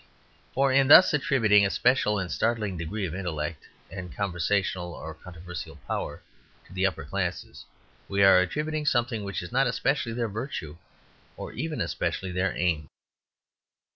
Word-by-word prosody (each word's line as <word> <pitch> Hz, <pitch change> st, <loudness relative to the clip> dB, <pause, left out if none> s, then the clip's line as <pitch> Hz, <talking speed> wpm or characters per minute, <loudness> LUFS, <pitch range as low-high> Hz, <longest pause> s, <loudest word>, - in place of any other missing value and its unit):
For 135 Hz, 0 st, +3 dB
in 135 Hz, 0 st, +4 dB
thus 180 Hz, +5 st, +9 dB
attributing 125 Hz, -9 st, +4 dB
a 100 Hz, -, +2 dB
special 120 Hz, -2 st, +2 dB
and 90 Hz, -3 st, -3 dB
startling 110 Hz, -4 st, 0 dB
degree 95 Hz, +5 st, -3 dB
of 85 Hz, -, -5 dB
intellect 80 Hz, -4 st, -4 dB, 0.2 s
and 95 Hz, -2 st, -7 dB
conversational 90 Hz, -1 st, -1 dB
or 80 Hz, +1 st, -7 dB
controversial 90 Hz, +2 st, -9 dB
power -, -, -4 dB, 0.4 s
to -, -, -16 dB
the 95 Hz, +1 st, +2 dB
upper 95 Hz, -, -5 dB
classes, 90 Hz, -3 st, -4 dB, 0.4 s
we 100 Hz, 0 st, +2 dB
are 95 Hz, -1 st, +7 dB
attributing 150 Hz, -, -2 dB
something 120 Hz, -4 st, +1 dB
which 100 Hz, -2 st, -4 dB
is 90 Hz, -, -8 dB
not 135 Hz, +1 st, +3 dB
especially 130 Hz, -1 st, 0 dB
their 120 Hz, 0 st, -1 dB
virtue 100 Hz, -, -5 dB, 0.6 s
or -, -, -7 dB
even 155 Hz, +4 st, -3 dB
especially 95 Hz, -1 st, -2 dB
their 90 Hz, +1 st, -1 dB
aim. 80 Hz, -4 st, 0 dB
100 Hz, 150 wpm, -27 LUFS, 90-125 Hz, 0.6 s, thus